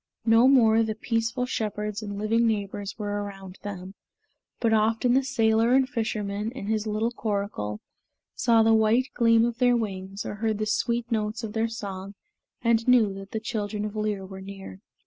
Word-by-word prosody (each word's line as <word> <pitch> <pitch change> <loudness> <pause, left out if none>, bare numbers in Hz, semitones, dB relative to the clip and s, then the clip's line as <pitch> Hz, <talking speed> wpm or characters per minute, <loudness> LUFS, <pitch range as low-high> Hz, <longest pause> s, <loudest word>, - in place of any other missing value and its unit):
No 225 +2 +6
more 230 -4 +5
the 220 -1 -1
peaceful 230 +3 -1
shepherds 210 -2 -3
and 205 -1 -6
living 225 +3 +2
neighbors 205 -2 -3
were 205 -1 -3
around 195 -2 -9
them; 190 -2 -7 0.7
but 230 -2 +2
often 225 +3 +2
the 270 +1 +3
sailor 230 -2 +2
and 265 -1 +4
fisherman, 215 -5 -2
in 260 -6 -7
his 215 0 -1
little 215 +2 0
coracle, 200 - -3 0.5
saw 230 -1 +3
the 225 0 +4
white 225 +4 +3
gleam 230 -1 +4
of 240 0 -3
their 245 -1 +4
wings 195 -2 -4
or - - -4
heard 215 0 -1
the 215 - -1
sweet 235 +2 -1
notes 220 +1 -1
of 215 -2 -5
their 225 0 +1
song 200 -3 -6 0.5
and 230 0 +2
knew 235 -5 +5
that 195 0 -9
the 220 - -3
children 210 -1 -3
of 210 0 -6
Lir 210 -2 -2
were 190 0 -9
near. 195 - -9
220 Hz, 180 wpm, -26 LUFS, 205-230 Hz, 0.7 s, No